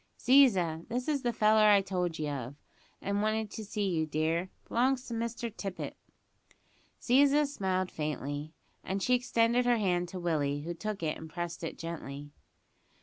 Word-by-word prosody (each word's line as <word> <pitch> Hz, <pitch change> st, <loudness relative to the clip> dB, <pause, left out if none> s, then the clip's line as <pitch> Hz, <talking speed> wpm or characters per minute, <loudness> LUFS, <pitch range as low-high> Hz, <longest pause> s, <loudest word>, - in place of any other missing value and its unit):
"Ziza, 195 Hz, -, +4 dB
this 250 Hz, +2 st, -3 dB
is 295 Hz, -3 st, +1 dB
the 240 Hz, -2 st, 0 dB
feller 215 Hz, -1 st, +4 dB
I 200 Hz, -1 st, +6 dB
told 180 Hz, -4 st, -2 dB
ye 155 Hz, -, -2 dB
of, 135 Hz, -2 st, -4 dB, 0.5 s
as 200 Hz, -, -2 dB
wanted 215 Hz, 0 st, 0 dB
to 220 Hz, -, -6 dB
see 205 Hz, 0 st, -2 dB
you, 160 Hz, -4 st, 0 dB
dear; 160 Hz, +4 st, 0 dB, 0.2 s
b'longs 255 Hz, +2 st, +1 dB
to 235 Hz, -, -5 dB
Mr 230 Hz, 0 st, -3 dB
Tippet." 195 Hz, -2 st, -5 dB, 1.0 s
Ziza 285 Hz, +4 st, +4 dB
smiled 190 Hz, -9 st, -1 dB
faintly, 150 Hz, 0 st, -4 dB, 0.3 s
as 195 Hz, 0 st, -2 dB
she 250 Hz, -, +2 dB
extended 240 Hz, 0 st, +2 dB
her 240 Hz, -1 st, +4 dB
hand 180 Hz, -4 st, 0 dB
to 185 Hz, -, -6 dB
Willie, 145 Hz, -4 st, 0 dB
who 170 Hz, +3 st, -4 dB
took 210 Hz, +1 st, -5 dB
it 155 Hz, -1 st, -1 dB
and 160 Hz, -, -9 dB
pressed 175 Hz, +1 st, -5 dB
it 165 Hz, -, -4 dB
gently. 145 Hz, -4 st, -7 dB
190 Hz, 165 wpm, -31 LUFS, 160-230 Hz, 1.0 s, I